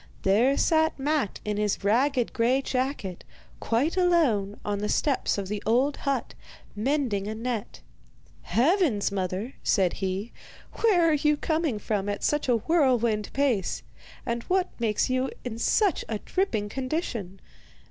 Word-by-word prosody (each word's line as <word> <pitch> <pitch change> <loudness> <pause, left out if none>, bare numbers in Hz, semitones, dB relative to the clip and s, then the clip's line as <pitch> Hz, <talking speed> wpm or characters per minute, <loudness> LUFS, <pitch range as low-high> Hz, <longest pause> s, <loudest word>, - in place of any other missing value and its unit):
There 230 +8 +3
sat 315 0 +2
Matte 285 -5 -1
in 210 -1 -1
his 210 -1 -1
ragged 245 +4 +2
grey 250 +4 +2
jacket, 255 -9 -2 0.4
quite 260 +10 0
alone, 295 - +2
on 205 -1 -1
the 210 +1 -2
steps 280 -7 +1
of 195 -1 -3
the 210 +1 -3
old 255 +6 +2
hut, 275 -4 -2 0.4
mending 225 -4 0
a 215 - -3
net. 230 -1 -4 0.6
'Heavens, 250 - +2
mother,' 190 +5 -3
said 190 -4 +2
he, 195 +4 -3 0.5
'where 370 -7 +4
are 320 - +4
you 300 0 +2
coming 315 -6 0
from 205 -1 -2
at 205 - -3
such 295 -3 0
a 245 - +5
whirlwind 235 -7 +1
pace, 260 -9 0 0.4
and 235 0 -2
what 370 0 +1
makes 220 -3 +1
you 255 +1 0 0.2
in 230 -2 -5
such 400 - +2
a 220 - -1
dripping 225 - -1
condition? 245 - -4
240 Hz, 145 wpm, -26 LUFS, 205-290 Hz, 0.6 s, a